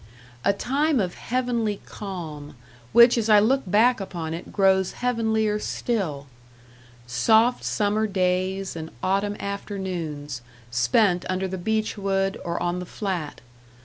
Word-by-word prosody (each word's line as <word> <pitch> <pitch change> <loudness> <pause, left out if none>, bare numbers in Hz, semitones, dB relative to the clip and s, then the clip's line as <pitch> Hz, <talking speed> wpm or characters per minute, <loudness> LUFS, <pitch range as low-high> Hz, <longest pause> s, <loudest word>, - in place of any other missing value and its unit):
A - - +4
time 275 +7 +1
of 180 -3 -1
heavenly 235 -4 -1
calm 160 -8 -7 0.4
which 235 0 +7
as 225 -1 -1
I 210 - +8
look 250 +7 +4
back 230 +6 +4
upon 170 -5 -5
it 170 - -7
grows 190 -2 +3
heavenlier 220 -3 0
still! 180 - -2 0.8
Soft 220 - +3
summer 215 +1 +1
days 185 0 0
and 160 -1 -6
autumn 200 +2 0
afternoons, 175 - -4 0.3
spent 175 - +3
under 185 +1 -1
the 190 0 -5
beech 215 +3 -1
wood, 195 0 0
or 170 0 -2
on 175 +1 -1
the 180 - -6
Flat. 180 -8 -4
195 Hz, 130 wpm, -24 LUFS, 175-220 Hz, 0.8 s, I